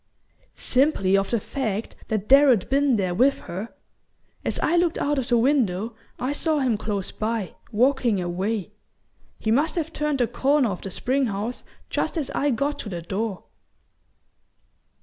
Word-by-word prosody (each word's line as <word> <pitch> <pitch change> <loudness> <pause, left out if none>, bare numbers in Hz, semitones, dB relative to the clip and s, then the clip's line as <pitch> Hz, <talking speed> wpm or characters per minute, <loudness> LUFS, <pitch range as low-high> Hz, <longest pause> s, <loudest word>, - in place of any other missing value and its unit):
"Simply 250 -8 +2
of 195 0 +1
the 235 - +1
fact 220 -3 -3
that 215 -2 -2
Darrow'd 270 -7 +6
been 275 -2 +3
there 185 -4 0
with 260 +9 +3
her. 190 +6 -6 0.7
As - - -1
I 340 - +2
looked 345 -2 +2
out 290 -1 0
of 255 - -3
the 240 - +4
window 230 -5 +1 0.2
I 255 +3 -2
saw 310 +1 0
him 260 -5 +2
close 205 -2 -3
by, 220 -3 -2 0.2
walking 245 -2 +2
away. 190 +4 -2 0.7
He 220 - -1
must 290 +7 +2
have 325 -1 -2
turned 300 -1 0
the 245 - +3
corner 260 +1 +2
of 180 - -5
the 195 - -5
spring 260 +7 0
house 215 +4 -4 0.3
just - - -1
as 295 -4 -2
I 290 - +1
got 280 +4 -1
to 210 - -5
the 175 -3 -5
door." 195 +2 -3
235 Hz, 165 wpm, -24 LUFS, 205-280 Hz, 0.7 s, Darrow'd